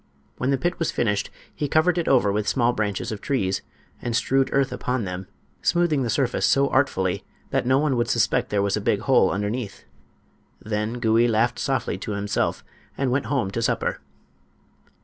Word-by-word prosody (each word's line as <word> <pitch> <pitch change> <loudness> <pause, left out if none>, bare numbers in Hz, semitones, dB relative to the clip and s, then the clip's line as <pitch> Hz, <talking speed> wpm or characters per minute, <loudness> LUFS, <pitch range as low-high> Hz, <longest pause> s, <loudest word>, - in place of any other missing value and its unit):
When 125 - 0
the 135 - +2
pit 175 +6 -2
was 165 - 0
finished 105 -3 0 0.2
he 145 - -2
covered 160 +4 +3
it 170 - -2
over 120 -6 +4
with 105 +1 -1
small 120 -2 +2
branches 105 +1 -2
of 105 - -5
trees, 95 -9 0 0.4
and 120 -1 -2
strewed 135 +4 +2
earth 135 0 +2
upon 125 -2 -2
them, 90 0 -5 0.3
smoothing 170 -5 +2
the 120 - -1
surface 120 +1 0
so 140 0 +3
artfully 95 -9 +1 0.3
that - - 0
no 130 +1 +4
one 145 -2 +1
would 120 0 0
suspect 120 -4 +1
there 100 -1 +1
was 100 -1 +1
a - - -2
big - - +1
hole - - +4
underneath. 105 +2 -3 0.8
Then 105 +1 -2
Gouie 115 -1 +3
laughed 115 +2 +1
softly 135 -1 -1
to 105 - -4
himself 100 0 -1 0.3
and 135 -2 0
went 135 +2 0
home 125 -9 0
to 115 - -2
supper. 115 - -1
120 Hz, 185 wpm, -24 LUFS, 105-135 Hz, 0.8 s, over